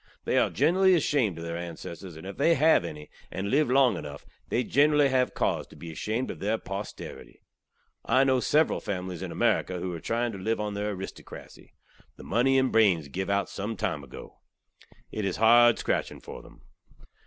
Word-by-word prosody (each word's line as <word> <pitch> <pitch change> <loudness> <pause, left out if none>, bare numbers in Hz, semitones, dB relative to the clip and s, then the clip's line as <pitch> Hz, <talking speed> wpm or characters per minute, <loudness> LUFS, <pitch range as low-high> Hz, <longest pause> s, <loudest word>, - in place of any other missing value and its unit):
They - - +2
are - - +2
generally 190 +2 +3
ashamed 135 - +1
ov 85 - -6
their 85 0 -4
ansesstors; 85 0 -8
and, 80 - -11
if 95 0 -7
they 170 - +4
hav 155 - +4
enny, 75 -3 -7 0.2
and 100 +2 -4
live 145 0 +3
long 130 -1 +4
enuff, 70 -1 -8 0.2
they 125 - +1
generally 145 +1 +3
hav 130 -1 +1
cauze - - -1
tew - - -16
be 85 - -9
ashamed 110 +10 -3
ov - - -10
their 105 +3 0
posterity. 100 0 -8 0.6
I 130 +3 +3
kno 130 -1 +3
ov - - -1
sevral 155 +5 +2
familys 90 -3 -4
in - - -5
Amerika 90 - 0
who 90 0 -4
are 85 - -5
trieing 120 +5 -1
tew 100 - -8
liv 110 +4 -1
on 105 -1 -3
their 105 0 -3
aristokrasy. 95 +1 -10 0.4
The - - -11
money 130 +5 +2
and 130 0 +1
branes 90 -10 +3
giv 95 +4 -3
out 100 0 +1
sumtime 95 -7 -3
ago. 65 - -12 0.7
It 110 - -4
iz 95 -2 -1
hard 120 +2 +6
skratching - - -2
for - - -9
them. - - -18
105 Hz, 190 wpm, -27 LUFS, 90-130 Hz, 0.7 s, hard